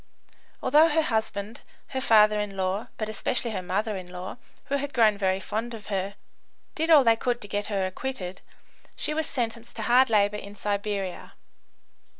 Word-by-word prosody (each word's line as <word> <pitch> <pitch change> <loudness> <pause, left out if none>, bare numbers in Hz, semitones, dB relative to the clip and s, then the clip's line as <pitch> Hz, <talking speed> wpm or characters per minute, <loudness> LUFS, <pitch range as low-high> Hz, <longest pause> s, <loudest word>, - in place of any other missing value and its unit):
Although 305 +4 +6
her 320 +1 +2
husband, 220 -2 -2 0.3
her 265 - -3
father 215 -4 +5
in 205 -2 -4
law, 190 +3 -1
but 215 - -2
especially 230 +2 -1
her 200 - -3
mother 205 +4 -1
in 185 -2 -6
law, 180 +3 -7 0.3
who 280 - 0
had 285 +1 -4
grown 220 -3 +5
very 190 -1 +1
fond 225 +4 -4
of 215 - -11
her, 195 +1 -2 0.6
did 320 +1 -1
all 305 -4 +8
they 230 -2 +5
could 240 +1 -1
to 205 - -4
get 205 +1 -2
her 195 -3 0
acquitted, 185 -2 -5 0.5
she 305 - -2
was 315 0 -1
sentenced 235 -2 -3
to 225 - -4
hard 250 +3 +5
labour 210 -1 +3
in 200 0 -9
Siberia. 200 -2 -3
215 Hz, 175 wpm, -26 LUFS, 200-240 Hz, 0.6 s, all